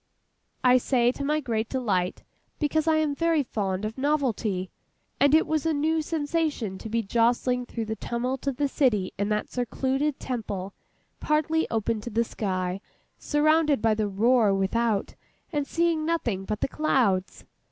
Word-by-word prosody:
I 255 0 +6
say 245 -1 +2
to 280 - -6
my 300 +2 +1
great 230 -4 -2
delight, 195 -9 -1 0.3
because 310 +1 0
I 320 - +4
am 310 -2 +1
very 330 0 +1
fond 200 -4 -2
of 220 +4 -5
novelty, 235 -10 0 0.5
and 285 +1 +5
it 320 - +4
was 310 -2 0
a 320 -1 +1
new 315 +2 +1
sensation 300 - -2
to 220 - -7
be 230 +1 0
jolting 240 +3 +1
through 230 -2 -4
the 220 0 -3
tumult 250 +4 -3
of 270 -3 -1
the 290 - +1
city 235 -10 +1
in 200 +1 0
that 210 0 -1
secluded 265 +4 -1
Temple, 205 -6 -4 0.5
partly 310 +1 +1
open 225 0 -1
to 240 - -6
the 230 +1 +1
sky, 185 -4 -3 0.4
surrounded 305 -1 +3
by 220 0 +3
the 215 -1 0
roar 215 +1 +3
without, 205 +2 0 0.4
and 290 -2 -1
seeing 335 0 +1
nothing 240 - -1
but 215 +1 -3
the - - +1
clouds. 240 -11 0
245 Hz, 165 wpm, -26 LUFS, 215-295 Hz, 0.5 s, I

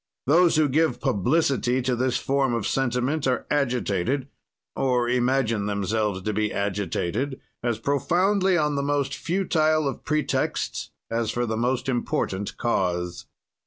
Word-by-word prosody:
"Those 170 +4 +4
who 155 -1 +4
give 155 +4 +1
publicity 130 - +1
to 125 0 +1
this 125 +1 +1
form 135 -3 +1
of 115 - -2
sentiment 135 +3 0
are 125 - 0
agitated 125 -2 0 0.5
(or 125 -2 +1
imagine 120 -4 +1
themselves 100 -1 -1
to 105 - -1
be 105 0 0
agitated) 100 - -2 0.2
as 120 -2 0
profoundly 180 - +2
on 150 -2 +1
the 140 - 0
most 140 -1 0
futile 155 -4 +1
of 135 - -4
pretexts 155 -1 -1 0.2
as 115 -1 0
for 120 +2 -1
the 110 -1 -2
most 125 +3 0
important 105 -5 -2
cause. 90 -6 -1
125 Hz, 135 wpm, -25 LUFS, 110-145 Hz, 0.5 s, Those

